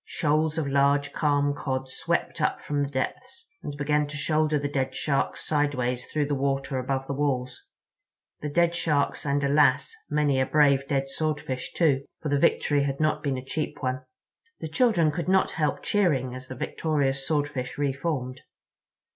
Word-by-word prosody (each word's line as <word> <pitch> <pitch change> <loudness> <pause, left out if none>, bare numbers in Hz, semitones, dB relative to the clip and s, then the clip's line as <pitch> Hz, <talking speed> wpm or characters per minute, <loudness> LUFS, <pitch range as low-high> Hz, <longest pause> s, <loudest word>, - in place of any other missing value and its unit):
Shoals 155 +1 0
of 160 - 0
large, 140 +1 +2
calm 145 -1 +2
Cod 130 -2 -3
swept 130 - -2
up - - +1
from 145 -1 -2
the 140 - -1
depths, 255 - -4
and 145 -1 -6
began 150 0 +1
to 145 0 -6
shoulder 155 +1 +1
the 145 0 -1
dead 135 -2 -2
Sharks 140 -2 -1
sideways 130 -5 0
toward 150 -2 0
the 145 - -1
water 135 -1 -1
above 135 +1 -2
the 140 - -3
walls—the 135 +1 -5
dead 170 +3 +2
Sharks 150 -4 0
and, 140 +1 +1
alas! 140 -1 +3 0.2
many 150 -2 +2
a 130 - +2
brave, 140 -2 +3
dead 135 -1 0
Swordfish, 135 -3 -3
too. 140 -5 +2 0.2
For 150 - -4
the 140 0 +2
victory 145 0 +3
had 140 -1 -1
not 155 -1 +1
been 140 -3 -1
a 130 - -7
cheap 155 0 -4
one. 130 0 -1 0.6
The 160 - -5
children 170 -4 +3
could 175 +3 -3
not 190 0 +3
help 150 -3 -1
cheering 145 -12 +1
as 130 0 -8
the 130 - -7
victorious 140 0 -1
Swordfish 145 -4 -1
re 140 -2 +1
formed. 135 -3 -3
145 Hz, 170 wpm, -26 LUFS, 135-150 Hz, 0.6 s, alas